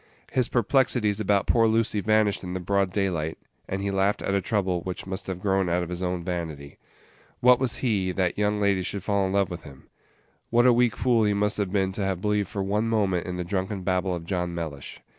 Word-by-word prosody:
His 125 Hz, -2 st, +1 dB
perplexities 120 Hz, -3 st, +2 dB
about 100 Hz, -1 st, +2 dB
poor 115 Hz, -1 st, +4 dB
Lucy 110 Hz, -1 st, +1 dB
vanished 110 Hz, -1 st, +2 dB
in 90 Hz, 0 st, -5 dB
the -, -, -2 dB
broad 95 Hz, +1 st, 0 dB
daylight, 90 Hz, -6 st, -1 dB, 0.3 s
and 95 Hz, +1 st, -2 dB
he 100 Hz, -, -1 dB
laughed 95 Hz, +1 st, +1 dB
at 95 Hz, -, -1 dB
a 100 Hz, -, +2 dB
trouble 95 Hz, -3 st, 0 dB
which 90 Hz, +1 st, -5 dB
must 95 Hz, +1 st, -6 dB
have 95 Hz, -2 st, -4 dB
grown 95 Hz, -2 st, +1 dB
out 90 Hz, +1 st, +1 dB
of 85 Hz, -, -6 dB
his 90 Hz, 0 st, -5 dB
own 90 Hz, -1 st, -2 dB
vanity. 80 Hz, -6 st, -5 dB, 0.6 s
What 125 Hz, 0 st, +6 dB
was 130 Hz, -3 st, +2 dB
he, 100 Hz, -6 st, +1 dB
that 90 Hz, -1 st, 0 dB
young 105 Hz, 0 st, 0 dB
ladies 100 Hz, -3 st, +1 dB
should 100 Hz, -2 st, -4 dB
fall 100 Hz, -2 st, +1 dB
in 95 Hz, -, -3 dB
love 100 Hz, -1 st, +1 dB
with 85 Hz, -, -6 dB
him? 70 Hz, -2 st, -14 dB, 0.6 s
What 120 Hz, +1 st, +4 dB
a 125 Hz, -, +7 dB
weak 120 Hz, -1 st, +2 dB
fool 120 Hz, -3 st, +3 dB
he 105 Hz, -1 st, +2 dB
must 105 Hz, +1 st, 0 dB
have 100 Hz, -3 st, -1 dB
been 95 Hz, -2 st, +1 dB
to 100 Hz, +1 st, -3 dB
have 95 Hz, -2 st, -1 dB
believed 105 Hz, 0 st, 0 dB
for 100 Hz, 0 st, -3 dB
one 105 Hz, +3 st, 0 dB
moment 100 Hz, -6 st, 0 dB
in 90 Hz, -1 st, -4 dB
the 90 Hz, -, -2 dB
drunken 95 Hz, +2 st, -3 dB
babble 90 Hz, 0 st, 0 dB
of 85 Hz, -1 st, -7 dB
John 90 Hz, -1 st, -2 dB
Mellish! 80 Hz, -5 st, -6 dB
95 Hz, 230 wpm, -26 LUFS, 90-105 Hz, 0.6 s, a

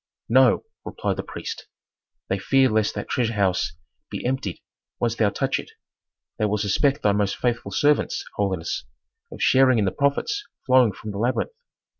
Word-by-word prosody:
"No," 130 Hz, +1 st, +5 dB, 0.2 s
replied -, -, -3 dB
the -, -, -1 dB
priest. -, -, -7 dB, 0.6 s
"They 95 Hz, -, -1 dB
fear 135 Hz, +5 st, +3 dB
lest 110 Hz, -1 st, +1 dB
that 105 Hz, -, -4 dB
treasure 115 Hz, -2 st, 0 dB
house 95 Hz, -3 st, +1 dB, 0.4 s
be -, -, -5 dB
emptied 125 Hz, -8 st, -2 dB, 0.4 s
once 115 Hz, -2 st, +1 dB
thou 110 Hz, -3 st, +3 dB
touch 100 Hz, -, -1 dB
it. -, -, -8 dB, 0.7 s
They 110 Hz, -, +2 dB
will 105 Hz, 0 st, +1 dB
suspect 120 Hz, +8 st, +1 dB
thy 105 Hz, -, +4 dB
most 100 Hz, -1 st, 0 dB
faithful 120 Hz, -1 st, -1 dB
servants, 145 Hz, 0 st, +1 dB
holiness, 95 Hz, -5 st, -2 dB, 0.5 s
of -, -, -5 dB
sharing 130 Hz, -2 st, +5 dB
in 105 Hz, -, +2 dB
the 95 Hz, -, +1 dB
profits 275 Hz, -, 0 dB, 0.2 s
flowing 130 Hz, -4 st, +5 dB
from 105 Hz, +2 st, -8 dB
the 100 Hz, -, -5 dB
labyrinth. 125 Hz, -, 0 dB
115 Hz, 165 wpm, -24 LUFS, 100-130 Hz, 0.7 s, No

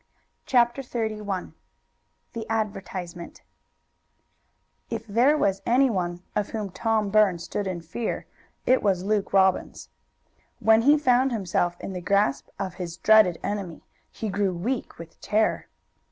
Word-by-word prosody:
CHAPTER 240 Hz, +1 st, +3 dB
XXXI 215 Hz, -6 st, -4 dB, 0.8 s
THE 230 Hz, -2 st, -6 dB
ADVERTISEMENT 195 Hz, -5 st, -4 dB, 1.5 s
If 225 Hz, -1 st, -4 dB
there 240 Hz, +8 st, +3 dB
was 195 Hz, -7 st, +1 dB
anyone 195 Hz, -9 st, +1 dB
of 210 Hz, -1 st, -1 dB
whom 210 Hz, -3 st, -4 dB
Tom 215 Hz, 0 st, 0 dB
Burns 195 Hz, -5 st, +3 dB
stood 205 Hz, +3 st, -3 dB
in 180 Hz, -2 st, -4 dB
fear 175 Hz, +8 st, -4 dB, 0.4 s
it 255 Hz, +1 st, +4 dB
was 190 Hz, -3 st, +1 dB
Luke 205 Hz, 0 st, 0 dB
Robbins. 190 Hz, -1 st, +1 dB, 0.7 s
When 220 Hz, 0 st, +5 dB
he 290 Hz, +5 st, +5 dB
found 260 Hz, -2 st, +3 dB
himself 175 Hz, -5 st, -1 dB
in 195 Hz, -, -6 dB
the 180 Hz, -, -5 dB
grasp 200 Hz, -5 st, +1 dB
of 190 Hz, -3 st, -4 dB
his 170 Hz, -1 st, -5 dB
dreaded 215 Hz, -4 st, +5 dB
enemy, 195 Hz, -5 st, -4 dB, 0.3 s
he 220 Hz, -, -5 dB
grew 195 Hz, -1 st, 0 dB
weak 235 Hz, +9 st, -3 dB
with 165 Hz, 0 st, -12 dB
terror. 215 Hz, +1 st, 0 dB
205 Hz, 130 wpm, -25 LUFS, 185-225 Hz, 1.5 s, When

